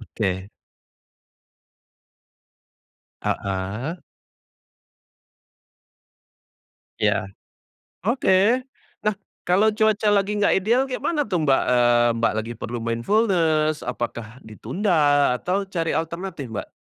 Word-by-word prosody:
Oke. 95 Hz, -4 st, -3 dB, 2.7 s
Ah -, -, 0 dB
hah. 100 Hz, -, -3 dB, 3.0 s
Ya. 95 Hz, -, +1 dB, 0.7 s
Oke. 235 Hz, +2 st, +2 dB, 0.3 s
Nah, 215 Hz, -1 st, 0 dB, 0.3 s
kalau 200 Hz, +5 st, +4 dB
cuaca 215 Hz, 0 st, +1 dB
lagi 205 Hz, 0 st, +1 dB
enggak 205 Hz, -1 st, +3 dB
ideal 235 Hz, +7 st, +2 dB
kayak 260 Hz, -2 st, -4 dB
mana 300 Hz, 0 st, 0 dB
tuh 185 Hz, -5 st, -1 dB
Mbak, 135 Hz, -, +4 dB
eee, 120 Hz, -1 st, +4 dB
Mbak 115 Hz, -1 st, +2 dB
lagi 110 Hz, +2 st, -3 dB
perlu 120 Hz, -1 st, -5 dB
mindfulness, 155 Hz, -, +1 dB
apakah 120 Hz, 0 st, -5 dB
ditunda 145 Hz, -, +1 dB
atau 190 Hz, +3 st, -1 dB
cari 170 Hz, -4 st, -2 dB
alternatif 165 Hz, -5 st, -4 dB
Mbak? 110 Hz, -, -5 dB
165 Hz, 95 wpm, -23 LUFS, -, 3.0 s, kalau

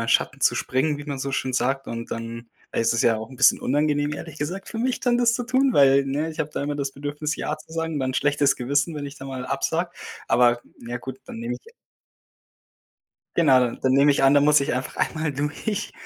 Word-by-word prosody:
meinen 115 Hz, -, -3 dB
Schatten -, -, +2 dB
zu -, -, +4 dB
springen, 145 Hz, +3 st, 0 dB
wie 145 Hz, -, -8 dB
man 140 Hz, -2 st, -4 dB
so 135 Hz, +1 st, -3 dB
schön 130 Hz, -1 st, -1 dB
sagt 135 Hz, +2 st, 0 dB
und 115 Hz, 0 st, -6 dB
dann 115 Hz, 0 st, -6 dB, 0.2 s
ist 115 Hz, 0 st, +2 dB
es 115 Hz, -, 0 dB
ja 115 Hz, -2 st, +3 dB
auch 110 Hz, +3 st, -7 dB
'n 130 Hz, -, -11 dB
bisschen -, -, +5 dB
unangenehm, 145 Hz, +1 st, +1 dB
ehrlich 155 Hz, +1 st, -7 dB
gesagt, 180 Hz, +7 st, -4 dB
für -, -, -7 dB
mich 250 Hz, +2 st, 0 dB
dann 245 Hz, -1 st, +2 dB
das 240 Hz, -1 st, +3 dB
zu 245 Hz, +1 st, -2 dB
tun, 260 Hz, +2 st, +2 dB
weil 140 Hz, 0 st, +5 dB
ne, 145 Hz, +4 st, -1 dB
ich 160 Hz, -, -6 dB
habe 155 Hz, -1 st, -2 dB
da -, -, -2 dB
immer 145 Hz, 0 st, -2 dB
das 140 Hz, -1 st, -3 dB
Bedürfnis, 145 Hz, +2 st, -4 dB
ja 150 Hz, -, -3 dB
zu 155 Hz, +1 st, -16 dB
sagen 165 Hz, 0 st, -2 dB
und 145 Hz, -, -1 dB
'n 130 Hz, 0 st, -1 dB
schlechtes 145 Hz, +1 st, +2 dB
Gewissen, 145 Hz, +6 st, 0 dB
wenn 145 Hz, -1 st, -4 dB
ich 140 Hz, +1 st, -9 dB
da 135 Hz, -, -9 dB
mal 130 Hz, -2 st, -5 dB
absage. -, -, -1 dB, 0.4 s
Aber 120 Hz, 0 st, +4 dB, 0.3 s
ja, 120 Hz, +1 st, -4 dB
gut, 130 Hz, +1 st, -7 dB
dann 245 Hz, -3 st, -9 dB
nehme 235 Hz, +2 st, -3 dB
ich 460 Hz, +2 st, -14 dB, 1.6 s
Genau, 145 Hz, -6 st, +6 dB
dann 130 Hz, +2 st, -1 dB
nehme 140 Hz, +2 st, +5 dB
ich 140 Hz, -, +2 dB
an 135 Hz, -, +6 dB
dann 145 Hz, 0 st, +5 dB
muss 150 Hz, -1 st, +6 dB
ich 140 Hz, -, -1 dB
einfach 125 Hz, +1 st, -3 dB
einmal 155 Hz, -1 st, -1 dB
durch 150 Hz, +9 st, -3 dB
145 Hz, 235 wpm, -24 LUFS, 130-155 Hz, 1.6 s, Genau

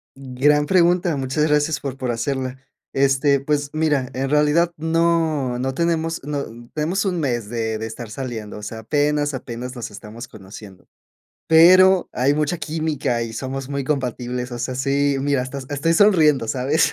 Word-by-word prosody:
Gran 135 Hz, +3 st, +1 dB
pregunta. 175 Hz, -1 st, +3 dB
Muchas 135 Hz, +3 st, 0 dB
gracias 150 Hz, 0 st, +1 dB
por 135 Hz, -2 st, -5 dB
por 130 Hz, -2 st, -2 dB
hacerla. 130 Hz, +2 st, -3 dB, 0.4 s
Este, 140 Hz, +1 st, +3 dB
pues 145 Hz, +1 st, -1 dB
mira, 150 Hz, -5 st, 0 dB
en 135 Hz, +1 st, -2 dB
realidad 150 Hz, +4 st, +3 dB
no 160 Hz, -5 st, +1 dB
no 135 Hz, +1 st, -2 dB
tenemos, 165 Hz, +1 st, -1 dB
no, 145 Hz, 0 st, -3 dB, 0.3 s
tenemos 170 Hz, +7 st, -1 dB
1, 180 Hz, -3 st, -1 dB
mes 120 Hz, -8 st, -2 dB
de 110 Hz, -1 st, -2 dB
de 110 Hz, -, -5 dB
estar 110 Hz, +1 st, -7 dB
saliendo. 115 Hz, -3 st, -6 dB
O 105 Hz, -, -10 dB
sea, 110 Hz, +2 st, -6 dB
apenas 145 Hz, +5 st, 0 dB
apenas 125 Hz, 0 st, -6 dB
nos 115 Hz, -3 st, -6 dB
estamos 110 Hz, +4 st, -10 dB
conociendo, 95 Hz, -1 st, -13 dB, 0.6 s
pero, 185 Hz, +3 st, +6 dB
hay 135 Hz, +3 st, +2 dB
mucha 150 Hz, +3 st, -1 dB
química 150 Hz, -6 st, -2 dB
y 115 Hz, -1 st, -5 dB
somos 135 Hz, +3 st, -5 dB
muy 140 Hz, 0 st, -2 dB
compatibles. 125 Hz, -3 st, -3 dB
O 120 Hz, -, -5 dB
sea, 130 Hz, +2 st, -3 dB
sí, 140 Hz, +2 st, +1 dB
mira 140 Hz, -1 st, +1 dB
hasta 130 Hz, +2 st, -6 dB
estoy 145 Hz, +3 st, +1 dB
sonriendo, 160 Hz, -, +4 dB
¿sabes? 135 Hz, +6 st, +1 dB
140 Hz, 165 wpm, -21 LUFS, 125-155 Hz, 0.6 s, pero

